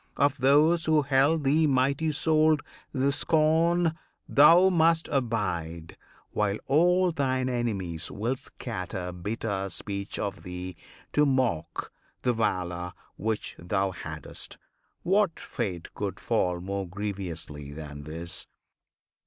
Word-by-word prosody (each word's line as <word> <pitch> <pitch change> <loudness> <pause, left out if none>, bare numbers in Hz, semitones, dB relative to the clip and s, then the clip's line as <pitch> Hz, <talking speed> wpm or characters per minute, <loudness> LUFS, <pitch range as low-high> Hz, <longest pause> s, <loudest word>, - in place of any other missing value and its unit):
Of 140 0 +2
those 150 +6 +4
who 155 -2 +4
held 140 +3 +3
thee 150 +3 +4
mighty 140 +3 +2
souled 155 0 +3 0.3
the 135 0 +1
scorn 165 +3 +2 0.3
Thou 170 +6 +7
must 165 -1 +3
abide, 90 - -2 0.4
while 105 -1 0
all 180 +5 +4
thine 130 -4 0
enemies 100 -10 -2
Will 115 +6 -1
scatter 95 -8 -6
bitter 100 +2 -3
speech 100 0 -5
of 100 - -3
thee, 90 0 -6 0.4
to 150 - +4
mock 115 - 0 0.3
The 125 - +3
valour 90 -5 -1 0.2
which 110 0 -2
thou 95 +2 0
hadst; 90 - -7 0.5
what 195 -2 +2
fate 95 - -4
could 100 -2 -4
fall 90 -6 0
More 95 +1 -3
grievously 85 -7 -5
than 75 -1 -8
this? 80 +3 -5
115 Hz, 115 wpm, -28 LUFS, 90-150 Hz, 0.5 s, Thou